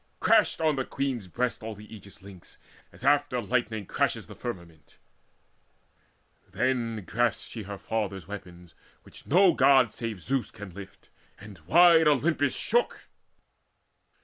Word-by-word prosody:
Crashed 220 -2 +3
on 155 -3 +1
the 130 - 0
Queen's 130 -7 -3
breast 125 +7 -2
all 110 0 -6
the 105 +2 -12
Aegis 100 -2 -13
links, 95 -3 -13 0.3
As - - -16
after 145 -2 +2
lightning 110 -2 -2
crashes - - -1
the - - -12
firmament. 85 -10 -9 1.5
Then 115 -1 -1
grasped 120 +4 -1
she 115 - -7
her 100 0 -7
father's 100 -5 -4
weapons, 90 -4 -10 0.3
which - - -16
no 180 +3 +5
God 130 -7 +4
Save 110 -7 -6
Zeus 135 -1 -1
can 105 -3 -10
lift, 100 +2 -12 0.3
and 100 -3 -12
wide 170 - +6
Olympus 145 0 +2
shook. 240 +2 -1
115 Hz, 135 wpm, -27 LUFS, 100-135 Hz, 1.5 s, wide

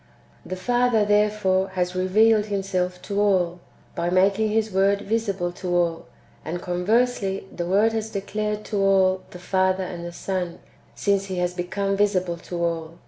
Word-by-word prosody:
The 185 - -5
Father 240 +2 +2
therefore 205 -2 +2
has 180 0 0
revealed 210 +4 +3
Himself 185 -3 -2
to 205 0 -1
all, 180 -4 +2 0.3
by 170 0 -1
making 195 +4 +3
His 220 0 0
Word 195 +1 +2
visible 200 -5 -1
to 175 0 -3
all; 170 -2 0 0.4
and, 175 +2 -4
conversely, 195 +2 0
the 175 -1 -3
Word 210 +5 +3
has 220 0 -2
declared 210 +1 -3
to 210 - -3
all 190 -1 +3
the - - -10
Father 185 +1 +1
and 175 -2 -6
the 175 - -6
Son, 180 -1 -3 0.4
since 200 -1 +1
He 190 -1 -5
has 180 0 0
become 195 +2 -2
visible 185 -4 +1
to 170 0 -5
all. 165 -1 -3
190 Hz, 160 wpm, -24 LUFS, 180-210 Hz, 0.4 s, revealed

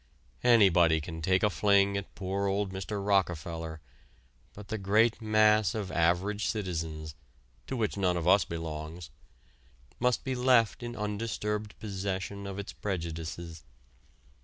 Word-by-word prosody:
Anybody 90 -9 +5
can 80 +1 -7
take 95 +4 +2
a 105 - +5
fling 100 +3 +3
at 100 0 -5
poor 100 +1 -2
old 100 0 -1
Mr. 100 +1 -4
Rockefeller, 85 -4 -1 0.7
but 105 0 -11
the 110 -1 -3
great 110 +4 +2
mass 110 -2 +3
of 100 -4 -3
average 90 +5 +1
citizens 80 -7 -3 0.5
(to 135 - -3
which 110 -3 -1
none 90 -3 +1
of 85 0 -2
us 100 +1 +6
belongs) 80 -1 -6 0.9
must 125 0 +1
be 130 - -2
left 125 -2 +3
in 120 0 -5
undisturbed 105 0 -3
possession 100 -1 -4
of 100 0 -6
its 100 - -6
prejudices. 85 -3 -5
100 Hz, 135 wpm, -30 LUFS, 85-105 Hz, 0.9 s, us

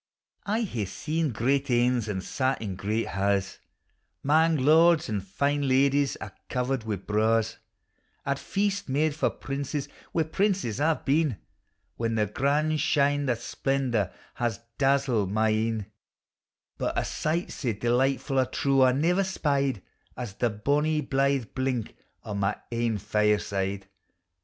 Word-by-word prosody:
I 220 +3 +1
iiae 110 - -3
see 155 - -2
great 135 +4 0
anes 120 -1 +2
and 95 -3 -3
sat 130 +5 -1
in 100 -4 -4
great 105 +4 -2
ha's, 100 -1 0 0.6
'Mang 160 +3 +4
lords 160 +4 +5
and 105 -3 -2
fine 140 +8 0
ladies 140 +1 +3
a' - - -7 0.2
covered 125 -2 -1
wi' 110 -2 -1
braws, 110 +3 +1 0.7
At 140 0 -1
feasts 200 -3 -1
made 150 +3 +2
for 150 - +1
primes 140 +1 -4 0.2
wi' 165 - +2
princes 180 - 0
I 160 +1 +3
've - - -16
been, 145 -4 +2 0.6
When 115 -1 -1
the 105 -1 +2
grand 150 +8 +1
shine 145 -1 +2
o' 120 - +3
splendor 120 -4 -1 0.2
has 120 -3 -2 0.2
dazzled 135 -8 +2
my 110 +1 +2
ecu; - - +2
29G 110 +1 +1
POEMS 115 - -1
OF - - -6
HOME. 105 - -32 0.9
But - - -1
a - - +1
sight 165 +4 -1
sae 120 -6 -2
delightfu' 130 +4 +1
I - - +1
trow 135 +1 +1
I 130 -1 +6
ne'er 175 +8 +2
spied 140 - 0 0.3
As 120 -5 -5
the 120 +4 0
bonny 145 +8 +1
blithe 135 -3 0
blink 130 -4 -2 0.3
o' 105 - -5
my 100 +1 0 0.2
ain 115 -2 0
fireside. 100 -2 0
130 Hz, 150 wpm, -27 LUFS, 110-145 Hz, 0.9 s, I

